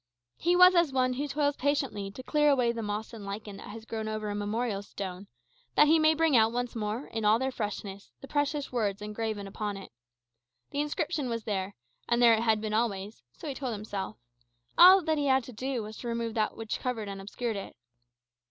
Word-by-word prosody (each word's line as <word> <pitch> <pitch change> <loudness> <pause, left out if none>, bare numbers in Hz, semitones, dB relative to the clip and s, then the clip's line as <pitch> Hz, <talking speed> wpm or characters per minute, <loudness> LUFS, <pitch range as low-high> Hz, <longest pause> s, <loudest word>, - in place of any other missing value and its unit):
He 350 +2 +2
was 365 +1 +8
as 340 -5 +3
one 255 -1 +2
who 285 +4 -2
toils 285 0 0
patiently 270 -8 -1
to 230 +6 -10
clear 295 +2 +3
away 250 -4 +3
the 230 -1 -4
moss 210 +2 -4
and 220 -3 -8
lichen 200 0 -6
that - - -10
has 220 +2 -9
grown 220 -1 -4
over 215 -1 -3
a - - -2
memorial 210 0 -2
stone; 195 -1 -7 0.5
that - - +7
he 320 +2 +5
may 310 0 +4
bring 320 -3 +3
out 225 -1 +5
once 245 0 -3
more, 220 +4 -3
in 225 -1 -5
all 210 +1 +5
their 265 +2 -1
freshness, 205 -4 -5
the 275 - -10
precious 290 0 -1
words 210 -4 -1
engraven 210 -1 -3
upon 205 +1 -4
it. 195 - -10 0.8
The 285 - 0
inscription 300 -2 -2
was 230 -1 -3
there, 200 -2 -3 0.3
and 235 0 +3
there 235 -1 +7
it 220 - +2
had 220 -2 +3
been 215 0 -3
always 215 -2 -1
(so - - -9
he 285 - -2
told 260 -3 -4
himself); 205 -2 -5 0.6
all 370 +2 +9
that 315 -1 +1
he 285 - 0
had 265 -1 +3
to 250 - -10
do 255 +1 -3
was 215 +1 -8
to 245 - -7
remove 230 -1 -2
that 215 -1 -1
which 225 -1 -4
covered 235 -5 -3
and 195 -1 -6
obscured 225 +3 -3
it. 195 - -7
230 Hz, 215 wpm, -29 LUFS, 210-275 Hz, 0.8 s, all